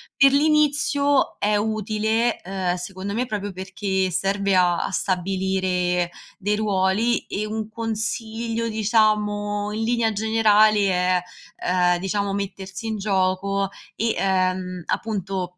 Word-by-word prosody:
Per 275 0 +6
l'inizio 285 -1 +2
è 210 +1 +2
utile, 220 +2 0
ehm, 185 -1 -2
secondo 190 +2 -6
me 245 +3 -1
proprio 205 -2 -3
perché 190 0 -2
serve 195 +2 0
a 180 -1 +5
a - - -2
stabilire 185 -1 0 0.3
dei 205 +2 0
ruoli 210 +2 +1
e 210 - -3
un 215 0 -4
consiglio, 230 0 -3
diciamo, 210 -1 +1
in 220 +1 -2
linea 230 -1 +1
generale 215 0 +4
è, 180 0 +2 0.4
ehm, 180 -1 +2
diciamo, 200 +1 -1
mettersi 200 +2 -5
in 220 - -2
gioco 195 0 0 0.3
e, 225 0 0
ehm, 185 -2 0
appunto, 190 -4 -3
205 Hz, 120 wpm, -23 LUFS, 190-220 Hz, 0.4 s, Per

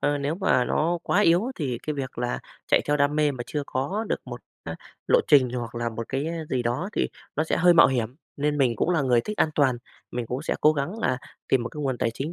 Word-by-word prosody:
ờ, 145 0 +1
nếu 145 +3 -1
mà 175 -10 +2
nó 170 +3 0
quá 205 - +2
yếu 180 +6 +3
thì 130 -7 -2
cái 155 - -1
việc 135 -3 -5
là 120 0 -1 0.3
chạy - - +4
theo 150 0 +1
đam 145 +1 +2
mê 150 -1 +3
mà 125 -2 -5
chưa 150 - -3
có 185 +12 -2
được - - -1
một, - - -8 0.2
à, - - -5 0.3
lộ - - +5
trình 130 -4 +6
hoặc 120 -2 -5
là 120 0 -1
một 115 0 -6
cái 135 +3 -2 0.2
gì 125 -2 0
đó 120 +11 -1
thì - - 0 0.3
nó 155 - +1
sẽ - - 0
hơi 175 0 +5
mạo 170 - +8
hiểm, 125 -2 -1 0.2
nên 145 +1 0
mình 125 -4 +2
cũng 170 - +1
là 170 -5 +2
người 125 -3 +3
thích 210 - -5
an - - +3
toàn, 135 -4 +3 0.3
mình 120 -1 -3
cũng 125 +5 -4
sẽ - - -1
cố 155 - +6
gắng 155 +9 -3
là 130 - 0 0.3
tìm 130 -2 +3
một 115 - -3
cái 150 - -8
nguồn 130 -3 -1
tài 115 - +1
chính 145 +7 -4
140 Hz, 265 wpm, -25 LUFS, 125-155 Hz, 0.3 s, mạo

